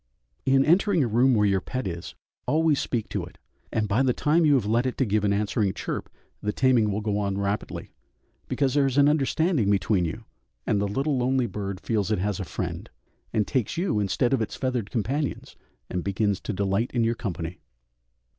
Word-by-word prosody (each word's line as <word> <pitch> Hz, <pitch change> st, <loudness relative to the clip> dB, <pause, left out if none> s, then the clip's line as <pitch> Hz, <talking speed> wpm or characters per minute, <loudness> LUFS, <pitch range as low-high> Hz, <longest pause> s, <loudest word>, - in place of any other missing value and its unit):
In 135 Hz, 0 st, +4 dB
entering 180 Hz, 0 st, +4 dB
a -, -, +1 dB
room 120 Hz, +3 st, +4 dB
where 105 Hz, -1 st, +3 dB
your 100 Hz, -2 st, +2 dB
pet 130 Hz, +6 st, -4 dB
is, 85 Hz, -2 st, -5 dB, 0.3 s
always 155 Hz, -1 st, +3 dB
speak 115 Hz, -4 st, -2 dB
to -, -, -2 dB
it, -, -, -11 dB, 0.3 s
and 110 Hz, -1 st, 0 dB
by 105 Hz, +5 st, +2 dB
the 130 Hz, -2 st, +3 dB
time 160 Hz, +3 st, +3 dB
you 145 Hz, -, +5 dB
have 125 Hz, -6 st, +1 dB
led 115 Hz, +4 st, +2 dB
it 125 Hz, -, -3 dB
to 135 Hz, -, +2 dB
give 105 Hz, -1 st, +1 dB
an 100 Hz, -, +2 dB
answering 100 Hz, 0 st, 0 dB
chirp, -, -, -4 dB, 0.3 s
the 105 Hz, -, -1 dB
taming 120 Hz, -4 st, +3 dB
will 105 Hz, +2 st, -2 dB
go 105 Hz, -1 st, -1 dB
on 100 Hz, -1 st, -1 dB
rapidly, 100 Hz, +1 st, -3 dB, 0.6 s
because 135 Hz, -3 st, 0 dB
there 140 Hz, -2 st, +3 dB
is 135 Hz, 0 st, -2 dB
an 140 Hz, 0 st, +6 dB
understanding 150 Hz, -, +2 dB
between 100 Hz, -1 st, +2 dB
you, 105 Hz, +8 st, -5 dB, 0.4 s
and 100 Hz, -, +1 dB
the 100 Hz, -, 0 dB
little 135 Hz, +6 st, 0 dB
lonely 130 Hz, 0 st, +2 dB
bird 100 Hz, -3 st, -4 dB
feels 105 Hz, -2 st, -1 dB
it 110 Hz, -, +1 dB
has 100 Hz, +1 st, -1 dB
a 95 Hz, -, -3 dB
friend, -, -, -5 dB, 0.4 s
and 105 Hz, -2 st, +1 dB
takes 130 Hz, 0 st, -1 dB
you 175 Hz, -, +1 dB
instead 105 Hz, +6 st, +1 dB
of 130 Hz, -, +2 dB
its 110 Hz, -, -3 dB
feathered 125 Hz, -5 st, -2 dB
companions, 135 Hz, +6 st, -2 dB, 0.3 s
and 90 Hz, -1 st, -3 dB
begins 100 Hz, 0 st, 0 dB
to -, -, -4 dB
delight 100 Hz, +4 st, 0 dB
in 120 Hz, -, +3 dB
your 115 Hz, +1 st, +2 dB
company. 90 Hz, -7 st, -5 dB
110 Hz, 205 wpm, -26 LUFS, 100-135 Hz, 0.6 s, an